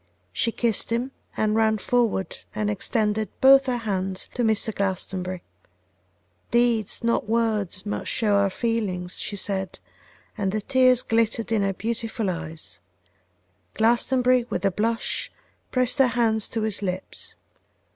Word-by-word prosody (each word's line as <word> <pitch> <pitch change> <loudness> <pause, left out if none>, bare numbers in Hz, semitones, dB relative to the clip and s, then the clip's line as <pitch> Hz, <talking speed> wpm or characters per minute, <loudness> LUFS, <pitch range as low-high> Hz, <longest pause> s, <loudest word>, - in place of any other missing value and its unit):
She 230 - +1
kissed 230 -1 0
him, 240 +3 -1 0.3
and 215 0 +1
ran 220 -1 +3
forward 220 -5 0 0.2
and 210 -1 0
extended 215 0 0
both 270 0 +7
her 250 -1 +1
hands 190 -4 -3
to 245 - -2
Mr. 220 0 +1
Glastonbury. 185 -2 -3 1.1
'Deeds, 235 -3 +2
not 230 -2 0
words, 215 -4 0
must 205 - -3
show 215 -3 +1
our 200 0 +3
feelings,' 195 -5 -2
she 205 - -3
said, 190 -2 -2 0.6
and 195 -3 -1
the 215 +1 -1
tears 255 +1 +4
glittered 230 0 0
in 220 -2 +2
her 195 0 +1
beautiful 225 -1 -2
eyes; 155 - -7 1.0
Glastonbury, 245 +2 +3
with - - -2
a 195 - +3
blush, 225 +4 -1 0.4
pressed 255 +2 +1
her 265 - +6
hand 230 -2 +1
to 225 - -2
his 215 -2 -1
lips. 185 -1 -5
220 Hz, 135 wpm, -24 LUFS, 195-235 Hz, 1.1 s, both